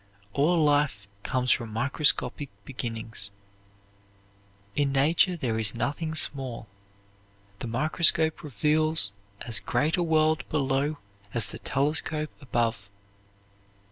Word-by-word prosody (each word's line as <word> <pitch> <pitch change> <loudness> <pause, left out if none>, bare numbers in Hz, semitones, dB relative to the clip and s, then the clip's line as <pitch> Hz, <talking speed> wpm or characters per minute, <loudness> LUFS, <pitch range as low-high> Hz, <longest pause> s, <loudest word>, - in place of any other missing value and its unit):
All 160 +5 +2
life 145 -10 +2
comes 125 +3 0
from 115 -2 0
microscopic 140 +2 +1 0.2
beginnings. 115 -5 -3 1.5
In 145 -1 +1
nature 160 +6 +3
there 115 -7 -1
is 110 +1 +1
nothing 155 +6 -2
small. 130 -7 0 0.9
The 120 - -5
microscope 155 +5 +3
reveals 150 -2 +2 0.3
as 115 -4 -3
great 150 - 0
a - - +1
world 160 -1 +1
below 140 +1 0 0.4
as 105 -4 -1
the - - -8
telescope 150 +2 -1
above. 115 -6 -1
140 Hz, 105 wpm, -27 LUFS, 115-155 Hz, 1.5 s, nature